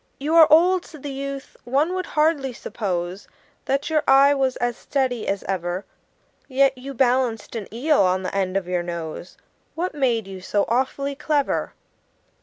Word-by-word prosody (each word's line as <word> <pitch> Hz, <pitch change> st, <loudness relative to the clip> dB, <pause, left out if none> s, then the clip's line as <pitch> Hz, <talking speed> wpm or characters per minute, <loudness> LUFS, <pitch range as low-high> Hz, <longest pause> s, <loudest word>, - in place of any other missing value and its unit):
"You 295 Hz, +4 st, -2 dB
are 330 Hz, -2 st, +8 dB
old," 355 Hz, +4 st, +5 dB
said 305 Hz, -4 st, -13 dB
the 285 Hz, -, -4 dB
youth; 275 Hz, 0 st, -6 dB
"one 280 Hz, +8 st, +1 dB
would 370 Hz, -1 st, -3 dB
hardly 300 Hz, -4 st, +1 dB
suppose 185 Hz, -5 st, -4 dB, 0.4 s
That 275 Hz, +4 st, -1 dB
your 310 Hz, -1 st, +3 dB
eye 275 Hz, +1 st, +6 dB
was 265 Hz, -2 st, 0 dB
as 240 Hz, -1 st, -1 dB
steady 255 Hz, -5 st, -2 dB
as 195 Hz, 0 st, -1 dB
ever; 180 Hz, 0 st, -3 dB, 0.6 s
Yet 270 Hz, 0 st, +3 dB
you 265 Hz, +2 st, -8 dB
balanced 245 Hz, -3 st, +1 dB
an 215 Hz, -4 st, -6 dB
eel 275 Hz, +4 st, +2 dB
on 185 Hz, 0 st, +2 dB
the 185 Hz, -, -4 dB
end 195 Hz, -1 st, 0 dB
of 190 Hz, -2 st, -3 dB
your 180 Hz, -1 st, 0 dB
nose 170 Hz, 0 st, -6 dB, 0.4 s
What 355 Hz, +3 st, -2 dB
made 245 Hz, -7 st, +1 dB
you 190 Hz, -1 st, -9 dB
so 200 Hz, +2 st, 0 dB
awfully 265 Hz, +3 st, 0 dB
clever?" 290 Hz, 0 st, -1 dB
260 Hz, 170 wpm, -23 LUFS, 195-280 Hz, 0.6 s, are